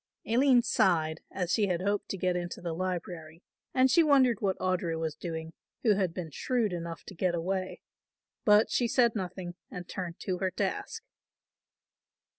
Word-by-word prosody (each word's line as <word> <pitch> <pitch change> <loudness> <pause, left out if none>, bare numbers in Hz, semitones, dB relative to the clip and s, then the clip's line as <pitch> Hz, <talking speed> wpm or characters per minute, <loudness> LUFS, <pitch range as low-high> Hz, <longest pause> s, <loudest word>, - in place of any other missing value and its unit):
Aline 245 +1 +4
sighed, 165 -8 +2
as 180 -2 -3
she 210 -3 +3
had 180 -1 -1
hoped 205 0 -1
to 195 - -3
get 180 -1 0
into 175 0 -4
the 170 -2 -4
library 170 -2 -4 0.3
and 260 0 +4
she 340 - +6
wondered 270 -7 +4
what 195 -3 +1
Audry 180 -3 -1
was 160 -1 -2
doing, 160 0 -6 0.3
who 220 - +5
had 190 -3 0
been 165 -2 -6
shrewd 230 - 0
enough 170 -1 -5
to - - -10
get 180 -1 0
away, 185 +2 -3 0.6
but 210 +1 +5
she 240 - +2
said 235 -1 +3
nothing 185 -2 -4 0.2
and 180 -1 -7
turned 175 -3 -5
to 185 -2 -2
her 190 - +1
task. 450 - -3
185 Hz, 170 wpm, -30 LUFS, 170-210 Hz, 0.6 s, she